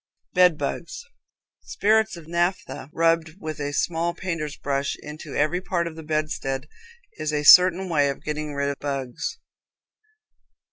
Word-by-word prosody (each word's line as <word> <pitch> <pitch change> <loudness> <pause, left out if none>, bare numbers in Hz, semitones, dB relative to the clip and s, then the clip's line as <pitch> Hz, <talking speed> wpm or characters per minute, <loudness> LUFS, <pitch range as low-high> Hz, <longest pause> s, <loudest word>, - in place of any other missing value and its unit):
Bed 180 -3 +5
Bugs. 170 - -4 0.6
Spirits 220 -1 +1
of 160 -2 -12
naphtha 170 -5 -2
rubbed 165 -1 +1
with 155 -4 -6
a 145 0 -2
small 170 +3 0
painter's 165 -5 -4
brush 140 0 -1
into 150 -1 -8
every 155 +5 +1
part 175 -2 -1
of 165 -1 -6
the 160 - -8
bedstead 150 -3 -2 0.5
is 155 0 -1
a 150 -1 -1
certain 180 +4 +8
way 145 -5 +2
of 140 - -5
getting 150 -1 -4
rid 140 0 0
of 140 - -4
bugs. 140 - -4
155 Hz, 145 wpm, -24 LUFS, 145-175 Hz, 0.6 s, certain